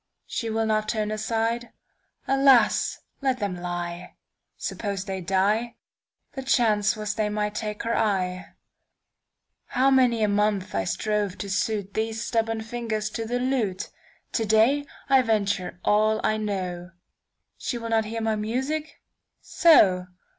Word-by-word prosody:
She 230 - -3
will 225 0 0
not 215 -1 0
turn 215 -2 -1
aside? 225 +2 -1 0.5
Alas! 270 -5 +4 0.2
Let 265 -2 +1
them 200 -5 -2
lie. 175 0 -5 0.4
Suppose 200 -3 -4
they 190 -2 -4
die? 205 +6 +1 0.6
The 270 - -6
chance 225 -6 +2
was 210 -1 -3
they 210 0 -1
might 210 0 -1
take 210 0 -4
her 230 0 0
eye. 185 -3 -1 1.1
How 265 +2 +2
many 245 -4 +4
a - - +4
month 205 -2 0
I 95 -1 0
strove 210 - -1
to - - -5
suitThese 215 +2 -1
stubborn 225 0 -1
fingers 220 -2 -3
to 225 0 -4
the 245 +2 -1
lute! 245 -7 -1 0.4
To 225 - 0
day 240 +7 +3 0.2
I 270 -1 +5
venture 200 -6 -1
all 215 +1 +3
I 215 - +2
know. 185 -4 -4 0.7
She 245 - -3
will 230 -1 -5
not 225 -1 +2
hear 225 +1 -4
my 220 -1 +1
music? 265 +9 -3 0.4
So! 190 - +4
215 Hz, 140 wpm, -25 LUFS, 205-235 Hz, 1.1 s, I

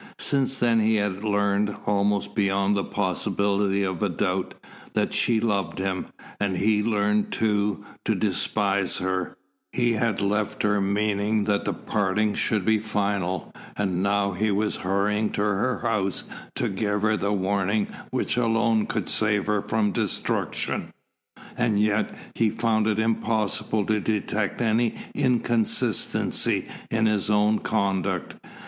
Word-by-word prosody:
Since 135 -1 +1
then 115 -2 +3
he 110 +1 +3
had 100 -1 -1
learned, 100 0 +1
almost 100 0 +1
beyond 100 -1 +1
the 100 - 0
possibility 100 +1 0
of 95 -3 -2
a 105 - +1
doubt, 90 +2 -1 0.4
that - - 0
she 115 -2 +2
loved 105 -5 -1
him, 95 -1 -2 0.3
and 95 -3 0
he 105 +3 +3
had 105 +1 0
learned, 105 -1 +1
too, 105 -2 0 0.2
to - - +1
despise 100 -3 +1
her, 95 -1 -2 0.3
he 120 -2 +1
had 110 -2 0
left 105 +1 -1
her 105 -1 +2
meaning 105 +1 +1
that 100 0 0
the - - 0
parting 105 +1 0
should 105 -4 0
be 110 -1 +3
final, 100 -5 -2 0.2
and 95 -3 0
now 100 0 +1
he 105 +4 0
was 105 +1 0
hurrying 105 +3 0
to - - -1
her 105 +5 0
house 100 -4 0 0.3
to - - 0
give 105 +1 -1
her 110 0 +3
the 100 0 -1
warning 100 +1 +1 0.2
which - - -1
alone 115 -2 +2
could - - -2
save 105 -2 +1
her 105 -1 +1
from 110 -1 0
destruction. - - -1 0.6
And 115 -4 +1
yet, 105 0 +2 0.2
he 115 -1 +2
found 110 0 +1
it 105 -1 +1
impossible 110 -1 0
to 110 +1 +1
detect 105 +1 -1
any 115 +1 +1 0.2
inconsistency 120 -4 +1 0.2
in 110 0 +1
his 105 -1 +1
own 105 +1 +3
conduct. 100 -4 -1
105 Hz, 145 wpm, -25 LUFS, 100-110 Hz, 0.6 s, then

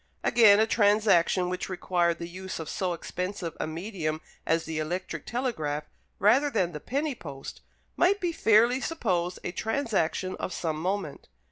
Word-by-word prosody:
Again, 215 -4 +6
a 220 - +5
transaction 205 -5 +3
which 180 +1 -3
required 175 -2 0
the 170 - -6
use 185 +2 -6
of 160 - -6
so 180 +2 -1
expensive 180 0 -4
a - - -1
medium 160 -2 -3 0.3
as 165 0 +2
the 160 -1 -3
electric 165 0 -4
telegraph 185 - -2 0.3
rather 250 +9 +4
than 190 -9 0
the 150 - -6
penny 285 - -2
post, 140 - -9 0.3
might 390 +3 +3
be 355 -3 0
fairly 235 -2 +4
supposed 185 - -1
a - - -3
transaction 205 - -1
of 185 - -4
some 155 -2 -2
moment. 185 -4 -3
185 Hz, 155 wpm, -28 LUFS, 165-225 Hz, 0.3 s, Again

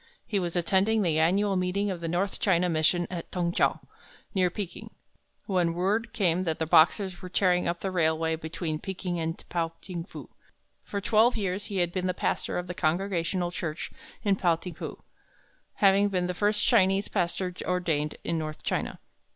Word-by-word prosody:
He 205 - 0
was 175 -2 -3
attending 195 +5 +2
the 160 -3 +2
annual 195 +5 +3
meeting 185 +2 0
of 175 -2 -5
the 165 - -2
North 180 +4 -1
China 180 -3 +3
Mission 170 +2 +2
at 170 -2 -6
Tung 175 -2 0
chou, - - +2 0.6
near 185 -3 +3
Peking 185 -1 -6 0.6
when 175 -4 +1
word 210 +6 0
came 180 -3 +1
that 160 -3 -1
the 160 - -1
Boxers 175 +4 +4
were 185 - -7
tearing 180 -1 +2
up 170 0 -2
the 190 - -2
railway 160 -2 +1
between 160 0 -4
Peking 180 -2 -4
and 165 0 -2
Pao 165 -1 -1
ting 175 -3 -6
fu. 180 - -10 0.6
For 200 - -4
twelve 225 +4 +4
years 200 0 -2
he 200 -3 -4
had 175 -1 +1
been 185 -1 -1
the 180 - -1
pastor - - -1
of 180 - -2
the 175 - -5
Congregational 175 +1 0
Church 165 -3 -4 0.3
in 200 -2 +2
Pao 175 -3 +3
ting 175 +2 -8
fu, - - -7 0.7
having 200 0 +4
been 180 -2 0
the 180 - -1
first 210 +3 +1
Chinese 195 -3 +4
pastor 180 -1 -1
ordained 165 -5 0
in 165 -1 -1
north 155 -1 -5
China. - - -2
180 Hz, 185 wpm, -28 LUFS, 170-195 Hz, 0.7 s, Boxers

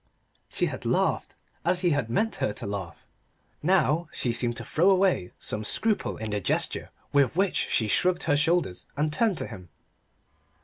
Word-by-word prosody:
She - - +1
had - - -5
laughed, - - 0 0.3
as 175 +2 +2
he 175 -2 +2
had 145 -6 0
meant 220 - 0
her 105 - -1
to - - -7
laugh. 95 -5 -6 0.6
Now 170 -1 +2
she 120 - -1
seemed 120 0 0
to - - -5
throw 175 +5 +3
away 185 - +2
some 105 - -2
scruple 215 - +2
in 110 -1 -5
the 105 - 0
gesture 90 - -1 0.2
with 140 +1 +3
which 195 0 +1
she 110 - +1
shrugged 180 - +1
her 145 -2 +2
shoulders 160 - 0
and 150 +1 0
turned 215 -1 +1
to - - -2
him. 90 -2 -10
150 Hz, 175 wpm, -27 LUFS, 110-180 Hz, 0.6 s, throw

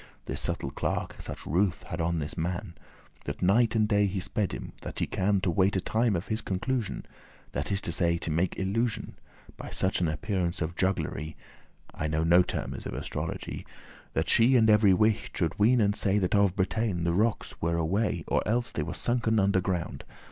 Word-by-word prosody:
This - - -3
subtle 70 - -2
clerk - - -2
such - - -8
ruth* 90 +4 +1
had 85 -3 -4
on 85 +1 0
this 75 0 -3
man, 90 +3 -3
*pity 70 - -27
That - - -5
night 110 +5 +4
and 110 -1 +3
day 105 -1 +3
he 95 0 -2
sped 100 +1 -1
him, - - -6
that - - -7
he - - +1
can, 100 +1 +1
To 95 - +1
wait 95 +4 +2
a - - +2
time 110 +3 +1
of 85 +3 -2
his 110 0 0
conclusion; 105 +3 -2 0.5
This 70 +1 -3
is 100 0 +1
to - - -2
say, 85 0 +2
to 85 - -3
make 85 +3 0
illusion, 105 +4 -1 0.4
By - - -7
such 95 0 +1
an 85 - +2
appearance 85 +2 -1
of 85 0 -3
jugglery 80 -5 -1 0.6
(I 80 - -2
know 80 +1 0
no 85 +2 +6
termes - - -4
of - - -5
astrology), - - -4 0.5
That - - 0
she 120 +4 +5
and 110 -3 +5
every 105 -2 +6
wight 110 +2 +2
should 85 0 -1
ween 120 +4 +5
and 100 -2 +2
say, 100 -2 +1
That 95 -3 0
of 100 -3 +3
Bretagne 100 -2 0
the 85 0 +1
rockes 105 +4 0
were 85 +1 +1
away, 95 +7 0
Or - - +2
else 120 +3 +1
they - - -2
were - - -4
sunken 115 -2 +1
under 95 -1 +3
ground. 90 -2 -3
95 Hz, 205 wpm, -28 LUFS, 85-110 Hz, 0.6 s, no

